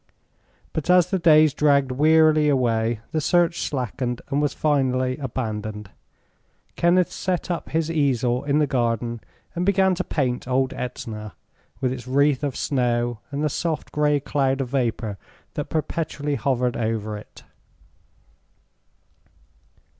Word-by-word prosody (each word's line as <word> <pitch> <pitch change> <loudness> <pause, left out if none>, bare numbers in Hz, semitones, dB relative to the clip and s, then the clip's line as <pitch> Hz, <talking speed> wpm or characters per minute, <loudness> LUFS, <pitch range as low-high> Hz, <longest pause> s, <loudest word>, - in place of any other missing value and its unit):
But 160 +1 -3
as 180 -1 +5
the 190 - +1
days 155 -3 +5
dragged 140 -3 +3
wearily 155 +2 +4
away 115 -4 +1
the 160 -1 0
search 175 +1 +2
slackened 125 -2 -2
and 140 +1 +1
was 145 -1 +1
finally 130 -4 +1
abandoned. 110 -6 -4 0.8
Kenneth 175 0 +3
set 185 -1 -2
up 170 - -4
his 165 0 0
easel 130 -5 +1
in 145 0 +1
the 150 - +3
garden 120 -3 -1 0.3
and 175 - -2
began 190 0 +3
to 185 +1 -2
paint 125 -7 -2
old 130 +1 +1
Etna, 110 -5 -6 0.5
with 130 -1 +1
its 125 -1 -8
wreath 140 +1 +2
of 140 -3 -2
snow 120 -4 0
and 145 +1 -3
the - - +3
soft 160 +2 -3
gray 150 -1 +2
cloud 135 -1 0
of 130 -3 -2
vapor 115 -6 -2 0.3
that 145 - -4
perpetually 155 -2 -2
hovered 125 -4 0
over 110 -2 -2
it. 105 - -12
135 Hz, 135 wpm, -23 LUFS, 120-155 Hz, 0.8 s, as